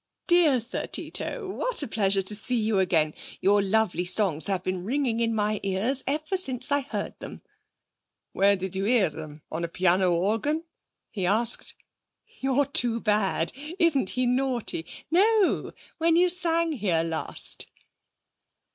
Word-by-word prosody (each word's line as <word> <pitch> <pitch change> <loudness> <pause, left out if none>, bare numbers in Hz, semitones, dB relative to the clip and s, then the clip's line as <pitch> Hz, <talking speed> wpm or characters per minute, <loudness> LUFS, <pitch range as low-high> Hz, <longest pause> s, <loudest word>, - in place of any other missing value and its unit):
'Dear 340 -7 +4
Sir 235 +3 -5
Tito, 445 -6 -4
what 470 0 +1
a - - -4
pleasure 195 -3 +1
to 210 +3 -4
see 250 +4 -3
you 215 -2 +1
again! 160 -5 +1 0.3
Your 205 +1 +3
lovely 195 -3 0
songs 180 -3 +2
have 190 -3 -2
been 185 -1 -3
ringing 245 +1 -1
in 230 -1 +1
my 210 0 0
ears 205 +8 -1
ever 310 +6 -1
since 260 -6 +2
I 285 - +3
heard 275 - -6
them!' - - -9 0.9
'Where 200 +1 +3
did 190 -1 -5
you 195 +1 -2
hear 225 -5 +3
them? 155 0 -10
On 160 +2 -4
a - - -1
piano 180 +1 +2
organ?' 225 - 0 0.5
he 190 -5 -2
asked. 225 +4 +1 0.6
'You're 270 +1 +1
too 240 -4 +2
bad! 210 -6 +1 0.2
Isn't 325 - +2
he 255 - +2
naughty? 245 -9 -1 0.2
No, 410 +3 +2 0.3
when 330 0 +3
you 355 +1 +3
sang 335 -2 +1
here 190 - 0
last.' 165 -1 -1
220 Hz, 150 wpm, -26 LUFS, 190-285 Hz, 0.9 s, Dear